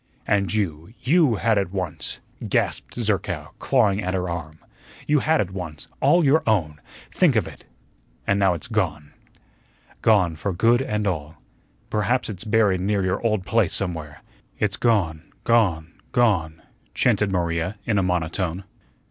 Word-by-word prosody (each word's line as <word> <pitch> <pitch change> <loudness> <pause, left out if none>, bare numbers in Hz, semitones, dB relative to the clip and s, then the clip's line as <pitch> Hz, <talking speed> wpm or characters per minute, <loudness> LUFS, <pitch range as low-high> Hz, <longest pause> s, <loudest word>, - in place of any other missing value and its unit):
"And 100 -2 +1
you, 95 -2 -2
YOU 145 -3 +3
had 110 +1 +2
it 95 -3 -2
once," 95 -5 -4 0.3
gasped - - -1
Zerkow, 100 -9 -2
clawing 105 -6 +2
at 95 -1 -2
her 90 -1 -1
arm; 80 -3 -5 0.5
"you 150 0 +3
had 160 +3 +2
it 95 - -1
once, 85 -5 -7
all 175 -2 +4
your 145 +4 +4
own. 80 -9 +1 0.3
Think - - +3
of - - +2
it, - - -12 0.6
and 100 +1 +2
now 95 -3 +3
it's 120 - -5
gone." 85 -10 -2 0.9
"Gone 95 -7 +3
for 90 +5 -3
good 115 +7 +3
and 105 -5 -2
all." 80 -5 -3 0.6
"Perhaps 110 +5 0
it's 95 +1 -7
buried 105 -4 +2
near 100 0 0
your 95 - -1
old 110 -5 0
place 110 -6 +2
somewhere." 80 -6 -4 0.3
"It's 105 -2 0
gone 95 -10 +1 0.2
gone 90 -9 +2 0.2
gone," 85 -10 +1 0.3
chanted 105 -2 +2
Maria 85 +2 -1
in 105 -3 +1
a - - +1
monotone. 90 +1 -1
95 Hz, 150 wpm, -23 LUFS, 85-110 Hz, 0.9 s, all